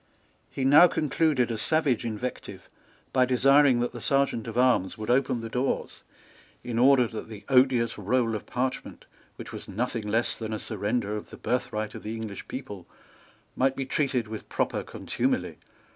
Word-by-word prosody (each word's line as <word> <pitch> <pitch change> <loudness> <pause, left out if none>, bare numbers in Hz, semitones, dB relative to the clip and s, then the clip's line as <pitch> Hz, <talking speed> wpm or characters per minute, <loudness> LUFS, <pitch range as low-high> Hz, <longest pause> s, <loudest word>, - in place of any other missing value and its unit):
He 135 - -4
now 145 +6 +8
concluded 150 -5 +1
a 110 - -3
savage 145 -4 +2
invective 115 +3 -5 0.5
by 130 -1 +4
desiring 135 0 +4
that 120 - -1
the - - -9
Serjeant 135 -5 0
at 115 +1 -5
Arms 125 -6 +2
would 110 +2 -2
open 125 -2 +1
the 115 - -5
doors, 125 +4 -2 0.6
in 115 -1 -2
order 130 0 +6
that 110 0 -8
the 110 -2 -10
odious 125 -4 +3
roll 115 +3 +1
of 105 - -5
parchment, 130 +1 -4 0.3
which - - -9
was - - -8
nothing 115 +1 -3
less 115 +3 0
than 110 -1 -4
a - - -1
surrender 105 0 -2
of 105 - -7
the - - -11
birthright 115 -3 -2
of - - -8
the 110 +1 -5
English 110 -3 -7
people, 105 -9 -7 0.7
might 135 +1 +2
be 135 - -3
treated 130 -5 0
with 110 0 -8
proper - - -1
contumely. - - -2
120 Hz, 170 wpm, -27 LUFS, 110-130 Hz, 0.7 s, now